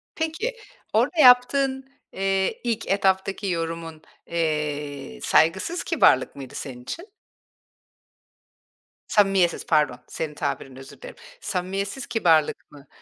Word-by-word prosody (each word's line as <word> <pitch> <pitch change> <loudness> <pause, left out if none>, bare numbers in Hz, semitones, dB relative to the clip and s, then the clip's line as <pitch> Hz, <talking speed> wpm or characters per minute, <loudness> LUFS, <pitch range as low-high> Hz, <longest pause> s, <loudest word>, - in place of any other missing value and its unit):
Peki, 325 +10 -2 0.4
orada 335 - +1
yaptığın, 265 +1 +5 0.3
eee, 195 0 -1
ilk 230 -2 -2
etaptaki 195 +1 +1
yorumun, 165 -2 -4 0.3
eee, 150 - -3
saygısız 190 - +2
kibarlık - - +3
mıydı 135 -2 -9
senin 125 -3 -7
için? 340 - -7 2.0
Samimiyetsiz, 195 -4 +2
pardon, 150 -6 +2
senin 155 -2 -5
tabirinle, 135 -2 -4
özür 135 - -13
dilerim. - - -10 0.3
Samimiyetsiz 195 +6 -3
kibarlık 165 -11 +1
mı? 145 -1 -15
185 Hz, 100 wpm, -24 LUFS, 150-230 Hz, 2.0 s, yaptığın